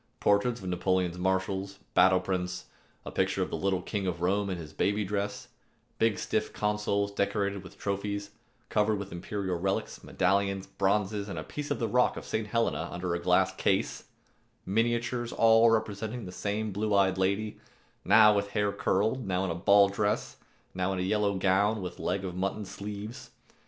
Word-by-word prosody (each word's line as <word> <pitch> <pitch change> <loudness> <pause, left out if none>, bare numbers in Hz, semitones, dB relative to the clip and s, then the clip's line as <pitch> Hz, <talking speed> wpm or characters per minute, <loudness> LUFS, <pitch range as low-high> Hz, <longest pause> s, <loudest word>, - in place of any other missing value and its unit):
Portraits 110 +4 +2
of 95 - -6
Napoleon's 90 -1 0
marshals, 95 +1 -1 0.2
battle 95 0 +5
prints, 90 -1 -3 0.4
a - - -6
picture - - +1
of - - -6
the - - -1
little 95 -2 0
King 100 -2 -2
of 85 -2 -2
Rome 100 +3 +1
in 95 - -2
his 80 -3 -9
baby 105 +4 0
dress; 100 +1 -3 0.5
big 110 -3 +2
stiff - - -1
consoles 105 -1 0
decorated 100 -1 -1
with 95 - -13
trophies, 100 0 -3 0.4
covered 105 0 +2
with 100 0 -6
imperial 95 0 -3
relics, 95 +2 -2
medallions, 100 +1 +1
bronzes, 100 +1 0
a - - -4
piece 150 -1 -6
of - - 0
the 115 - -1
rock 125 +3 +2
of - - -7
St. 110 -1 -2
Helena 105 -6 0
under 90 0 -3
a 85 - -1
glass 90 +1 +3
case, - - 0 0.6
miniatures 120 +3 0
all 115 0 +5
representing 110 +1 -1
the 90 - -7
same 105 +3 -2
blue 105 +1 0
eyed 95 -1 +3
lady, 100 +3 0 0.4
now 105 -1 +7
with 100 0 0
hair 105 -1 +1
curled, 105 +4 0
now 95 0 0
in 90 - -1
a - - 0
ball 100 +4 +5
dress, 105 +1 -1 0.4
now 95 +1 -1
in - - -3
a 90 - -1
yellow 100 +1 +1
gown 100 +3 +2
with 90 -2 -6
leg 95 0 -1
of 90 -2 -5
mutton 95 +3 -2
sleeves. 100 +3 -7
100 Hz, 175 wpm, -29 LUFS, 95-105 Hz, 0.6 s, now